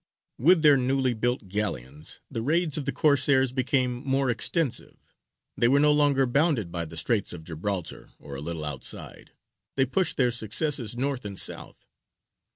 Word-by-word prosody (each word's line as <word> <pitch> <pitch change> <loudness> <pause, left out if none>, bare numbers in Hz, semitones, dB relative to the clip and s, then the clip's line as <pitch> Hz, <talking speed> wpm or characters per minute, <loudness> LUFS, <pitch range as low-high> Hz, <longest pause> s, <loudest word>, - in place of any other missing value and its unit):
[Illustration: 140 - +2
ANCHOR.] 185 - +8
With - - -3
their 145 -2 +7
newly 130 0 +1
built 120 -1 -2
galleons, 75 - -4
the 115 - -3
raids 155 +4 +1
of 145 - -1
the - - -1
Corsairs 135 -3 +2
became 130 -1 -1
more 135 -2 +1
extensive: 135 +4 0 0.6
they 120 - +2
were 140 +3 +4
no 150 +1 +4
longer 145 -2 +3
bounded 130 - +1
by 85 -1 -3
the 80 +1 -10
Straits 105 +3 0
of 85 -2 -9
Gibraltar, 85 +2 -4
or 70 - -11
a 70 - -6
little 80 0 -4
outside; 75 -4 -6 0.4
they 135 - +2
pushed 175 +6 0
their 125 -2 +2
successes 120 +1 0
north 135 0 -2
and 100 -2 -7
south. - - -3
125 Hz, 170 wpm, -26 LUFS, 100-140 Hz, 0.6 s, ANCHOR